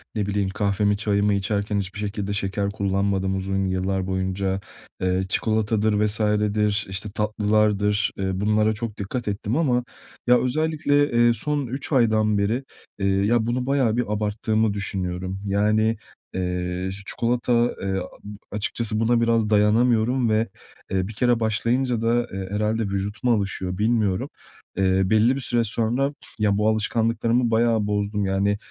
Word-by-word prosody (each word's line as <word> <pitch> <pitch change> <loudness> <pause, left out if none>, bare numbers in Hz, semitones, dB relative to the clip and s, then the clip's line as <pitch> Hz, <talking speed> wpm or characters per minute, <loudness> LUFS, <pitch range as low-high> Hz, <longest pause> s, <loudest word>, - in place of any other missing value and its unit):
ne 105 - 0
bileyim, 100 -1 -1
kahvemi, 100 0 +1
çayımı 105 0 +1
içerken 100 +1 -1
hiçbir 100 +1 -5
şekilde 100 -1 -3
şeker 100 0 -1
kullanmadım 100 -1 0
uzun 95 0 -1
yıllar 95 0 -1
boyunca. 95 +1 -1 0.4
Eee, 95 0 +1
çikolatadır 110 -1 +1
vs.dir, 105 -1 +1
işte, 95 +2 -4
tatlılardır, 105 -1 +1
ııı, 95 -1 -1
bunlara 105 +1 +2
çok 110 -1 -5
dikkat 115 +4 -4
ettim 105 +5 -2
ama, 125 -7 +2 0.4
ya, 125 0 +6
özellikle, 145 +1 +1
eee, 120 0 +4
son 145 +4 -2
3 135 +6 -4
aydan 110 -5 +3
beri, 110 +6 0 0.4
eee, 100 - 0
ya, 105 +4 +2
bunu 125 +2 -1
bayağı 130 -5 +1
bir 125 - +2
abarttığımı 110 0 0
düşünüyorum. 95 -2 -3
Yani, 105 +3 +2 0.4
eee, 90 0 -2 0.2
çikolata, 120 +1 +1
eee, 95 0 -1
a 90 - -5 0.5
açıkçası 110 +1 -1
buna 115 +1 +2
biraz 115 -2 +2
dayanamıyorum 115 +3 +3
ve, 110 +1 +2 0.4
eee, 95 -1 0
bir 110 - -7
kere 120 +2 +2
başlayınca 115 +2 0
da, 120 +1 +1
eee, 95 -1 -4
herhâlde 110 +2 0
vücut 100 +2 -3
mu 125 - +3
alışıyor 95 -3 -2
bilmiyorum. 105 -3 +1 0.5
Eee, 95 0 +2
belli 110 +6 +3
bir - - -3
süre 120 -2 +1
sonra, 115 +6 0 0.3
ya, 105 -1 +2
bu 105 - +2
alışkanlıklarımı 115 +2 +1
bayağı 110 -2 +2
bozdum. 105 0 -1
Yani, 100 +2 +1
105 Hz, 145 wpm, -23 LUFS, 100-115 Hz, 0.5 s, ya